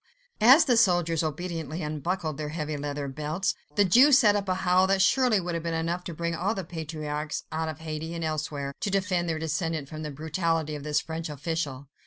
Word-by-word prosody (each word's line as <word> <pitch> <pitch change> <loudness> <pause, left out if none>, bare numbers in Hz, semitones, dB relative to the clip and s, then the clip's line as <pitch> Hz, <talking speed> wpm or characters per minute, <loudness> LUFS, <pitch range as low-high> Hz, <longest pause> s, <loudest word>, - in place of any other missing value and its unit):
As 265 +9 +8
the 245 -5 +3
soldiers 175 -6 +3
obediently 165 0 -4
unbuckled 155 +1 -2
their 150 -1 -4
heavy 155 -1 -3
leather 145 0 -4
belts, 155 +8 -2 0.2
the 205 - +4
Jew 250 +11 +6
set 230 -7 +6
up 200 -2 -1
a 185 - +2
howl 185 0 +3
that 195 0 +2
surely 225 +2 +4
would 175 -1 -3
have 170 - -2
been 165 0 -2
enough 170 +2 -2
to 170 - -5
bring 170 +1 -2
all 190 +6 -1
the 190 - -3
patriarchs 155 -2 -4
out 160 0 -2
of 155 0 -7
Hades 160 +1 -5
and 165 - -4
elsewhere, 150 -3 -3
to - - -1
defend 185 -3 0
their 160 - -1
descendant 160 -1 -2
from 155 0 -7
the 155 - -4
brutality 160 +1 -1
of 150 - -5
this 150 0 +1
French 160 0 -5
official. 145 -2 -4
165 Hz, 210 wpm, -27 LUFS, 150-185 Hz, 0.2 s, As